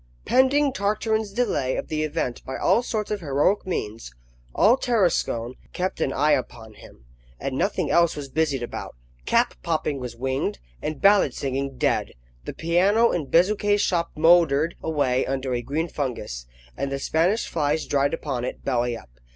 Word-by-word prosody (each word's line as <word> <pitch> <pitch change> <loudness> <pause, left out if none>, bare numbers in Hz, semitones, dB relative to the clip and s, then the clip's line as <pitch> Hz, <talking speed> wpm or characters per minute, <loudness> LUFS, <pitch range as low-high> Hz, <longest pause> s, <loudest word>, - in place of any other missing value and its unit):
PENDING 270 +2 +3
Tartarin's 215 -1 -1
delay 195 - 0
of - - -4
the 155 -1 -2
event 155 -5 -2
by 130 - -5
all - - +3
sorts 220 -4 -3
of 210 - -1
heroic 155 +6 +1
means, 110 - -4 0.4
all 225 +4 +5
Tarascon 180 - 0 0.2
kept 185 +1 -2
an 135 - +1
eye 150 +3 +2
upon 120 -5 -2
him, 65 - -16 0.3
and - - -3
nothing - - 0
else 170 -1 +3
was 145 -2 -6
busied 140 -3 0
about. 120 - -6 0.3
Cap - - +3
popping 145 - -1
was 125 -2 -6
winged, 130 - -2 0.2
and 155 -2 -4
ballad 195 -10 +4
singing 135 -1 -3
dead. - - 0 0.3
The - - -5
piano 195 +8 +3
in 155 -5 -2
Bezuquet's 205 +5 +3
shop 170 -4 0
mouldered 160 -1 +4
away 140 -5 +1
under 130 -1 -2
a 120 - -1
green 155 +7 -2
fungus, 125 - -4 0.3
and 140 0 -3
the 140 - -1
Spanish 170 +10 +1
flies 150 -1 0
dried 140 +2 +1
upon 135 -7 -4
it, - - -6
belly 120 -2 0
up. 65 - -16
150 Hz, 165 wpm, -24 LUFS, 130-190 Hz, 0.4 s, all